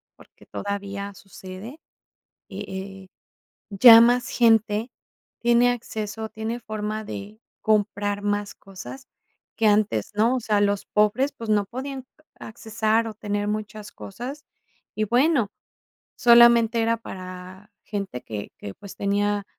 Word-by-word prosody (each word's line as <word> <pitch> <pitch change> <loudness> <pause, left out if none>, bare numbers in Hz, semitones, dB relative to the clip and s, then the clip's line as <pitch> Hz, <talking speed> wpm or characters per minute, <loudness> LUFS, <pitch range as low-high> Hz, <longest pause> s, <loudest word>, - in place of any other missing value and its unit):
porque, - - -20
todavía 200 0 -5
sucede, 195 +8 -11 0.7
eh - - -7
eh, 190 0 -8 0.6
ya 225 +3 +9
más 245 +1 +3
gente 225 -1 +2 0.5
tiene 240 +1 +4
acceso, 220 -2 -5
tiene 220 +2 -5
forma 215 -1 -4
de 205 +1 -8 0.2
comprar 205 -1 0
más 205 0 -2
cosas 195 +7 -11 0.5
que 225 - +2
antes, 205 - +2
¿no? 225 +5 +2
O - - -2
sea, 210 -2 +1
los 205 -1 0
pobres, 210 +7 +2
pues, 230 -1 -6
no 205 -1 +3
podían 265 +4 -6 0.3
accesar 220 0 -1
o 220 - -8
tener 205 -1 -3
muchas 210 0 -5
cosas. 255 +9 -8 0.5
Y 215 - 0
bueno, 245 +1 +2 0.7
solamente 235 -1 +6
era 230 +1 +2
para 185 0 -10
gente 200 - -5
que 105 -2 -6
que, 100 - -7
pues, 200 - -12
tenía 205 0 0
215 Hz, 125 wpm, -24 LUFS, 200-230 Hz, 0.7 s, ya